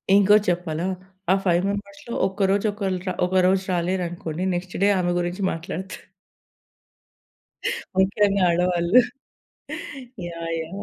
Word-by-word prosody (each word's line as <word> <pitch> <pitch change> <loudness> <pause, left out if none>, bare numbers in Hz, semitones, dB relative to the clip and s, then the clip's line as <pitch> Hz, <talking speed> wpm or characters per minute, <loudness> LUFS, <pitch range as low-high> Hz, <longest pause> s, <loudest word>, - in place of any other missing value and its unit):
ఇంకోటి 205 +1 +5
చెప్పాలా, 170 -1 -2 0.5
ఆ - - +7
5 175 0 +3
మెంబర్స్‌‌లో 200 +3 -5
ఒక్కరోజు 195 +1 +1
ఒకలు 195 -3 -2 0.3
ఒకరోజు 185 +1 +3
రాలేరనుకోండి 175 -1 -2
నెక్స్ట్ 180 +1 -5
డే 205 - +5
ఆమె 175 0 +1
గురించి 175 +3 -2
మాట్లాడతారు. 175 +3 -6 2.0
ముఖ్యంగా 200 0 +3
ఆడవాళ్ళు. 175 +5 +4 1.3
యాహ్! 165 -1 -5
యాహ్! 185 +5 -7
185 Hz, 100 wpm, -24 LUFS, 175-200 Hz, 2.0 s, ఆ